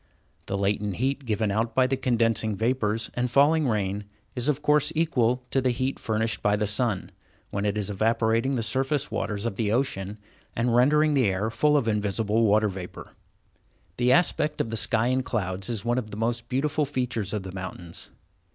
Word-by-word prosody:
The 100 - -2
latent 100 0 0
heat 135 +4 -1
given 110 -2 0
out 110 +3 -1
by 130 - +5
the 130 +1 +1
condensing 115 -4 +1
vapors 115 0 0
and 125 0 -1
falling 145 +4 +4
rain 105 -2 -1 0.3
is 125 +3 -1
of 150 0 0
course 150 0 +3
equal 125 -6 +1
to 135 - +2
the 130 - +1
heat 130 +2 -1
furnished 110 0 -1
by 105 0 +2
the 105 0 0
sun, 105 -1 -1 0.4
when 100 +1 -1
it 100 +1 -1
was 105 -1 -2
evaporating 115 +5 +1
the 115 - -1
surface 135 +5 0
waters 105 +1 -2
of 110 -5 -3
the 105 -2 0
ocean, 105 -5 -1 0.4
and 120 0 +1
rendering 150 +5 +4
the 130 -6 +3
air 100 +4 -1
full 150 +5 +3
of 130 -5 0
invisible 105 +1 +1
water 105 +1 +4
vapor. 95 -3 -8 0.9
The 125 0 +3
aspect 150 0 +2
of 115 - -1
the 115 - -3
sky 115 0 +2
and 130 +1 +1
clouds 95 -4 -2
is 115 -2 -3
one 120 +1 +1
of 110 -4 -7
the 105 - -7
most 115 +1 -2
beautiful 150 +3 0
features 125 -7 -2
of 105 -3 -3
the 95 - -7
mountains. 90 -2 -7
115 Hz, 190 wpm, -26 LUFS, 105-130 Hz, 0.9 s, by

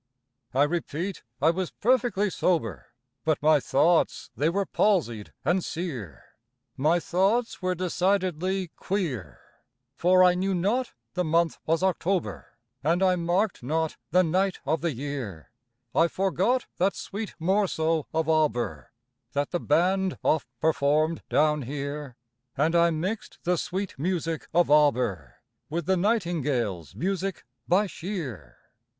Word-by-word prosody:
I 140 - +5
repeat, 170 +3 -2 0.2
I 160 - +6
was 180 0 -2
perfectly 235 -4 +1
sober, 115 - 0 0.4
But 155 -1 +1
my 155 0 +5
thoughts 160 +6 +2
they 150 +3 +2
were 195 +3 0
palsied 150 - +1
and 180 0 +2
sear, 130 - -5 0.5
My 155 +6 +2
thoughts 195 +9 +1
were 185 0 0
decidedly 185 0 0
queer; 165 - -3 0.5
For 185 +5 +4
I 180 -1 +6
knew 190 +1 0
not 225 +8 0 0.2
the 180 - 0
month 165 +1 +1
was 165 +3 +1
October, 185 -8 -1 0.3
And 170 +5 +2
I 185 -1 +4
marked 180 +4 0
not 160 +5 -1
the 180 +2 +4
night 185 +3 +1
of 155 +3 0
the 170 -1 0
year; 130 - -6 0.4
I 165 - +4
forgot 195 +7 +1
that 190 +3 +2
sweet 205 0 -6
morceau 165 -3 +1
of 160 -1 0
Auber 155 -7 0 0.4
That 145 0 -1
the 175 - 0
band 185 +5 +1
oft 155 - +2
performed 155 +1 +2
down 150 0 +3
here, 140 0 -5 0.4
And 155 +4 +2
I 170 0 +5
mixed 180 +7 -3
the 180 +1 +2
sweet 185 -1 -4
music 165 -1 -2
of 170 -2 +3
Auber 125 - +2 0.3
With 165 +1 -2
the 190 - +3
Nightingale's 150 - 0
music 190 0 -2 0.2
by 190 +4 +4
Shear. 155 - -6
170 Hz, 130 wpm, -27 LUFS, 150-185 Hz, 0.5 s, I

